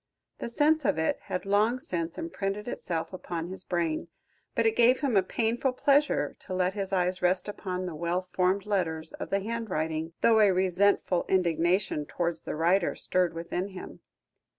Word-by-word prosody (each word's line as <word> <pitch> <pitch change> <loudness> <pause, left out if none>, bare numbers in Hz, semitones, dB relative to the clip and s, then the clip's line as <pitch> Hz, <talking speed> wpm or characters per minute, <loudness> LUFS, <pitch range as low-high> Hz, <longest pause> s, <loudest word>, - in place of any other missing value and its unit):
The - - -4
sense 300 +5 +3
of 210 - +1
it 160 - 0
had 180 - -3
long 210 +5 +3
since 170 -8 -4
imprinted 210 - -3
itself 170 -7 -3
upon 175 -2 -5
his 190 0 -7
brain, 170 -2 -1 0.5
but 230 - +2
it 225 0 +3
gave 240 +2 +4
him 270 -6 +1
a 195 - +6
painful 235 +6 0
pleasure 280 - +2
to 185 - -6
let 185 0 +1
his 200 -2 -3
eyes 185 -1 0
rest 180 +2 +2
upon 185 -3 -4
the 180 - -4
well 170 +3 -2
formed 185 +2 +1
letters 165 -6 -1
of - - -6
the 195 0 +1
handwriting, 165 -8 -3
though 225 -1 +5
a 210 -2 +6
resentful 185 0 +2
indignation 175 -3 +1
towards 170 -2 -2
the - - -3
writer 170 +4 +2
stirred 180 -2 0
within 170 +3 -3
him. 190 -2 -9
185 Hz, 175 wpm, -28 LUFS, 170-210 Hz, 0.5 s, a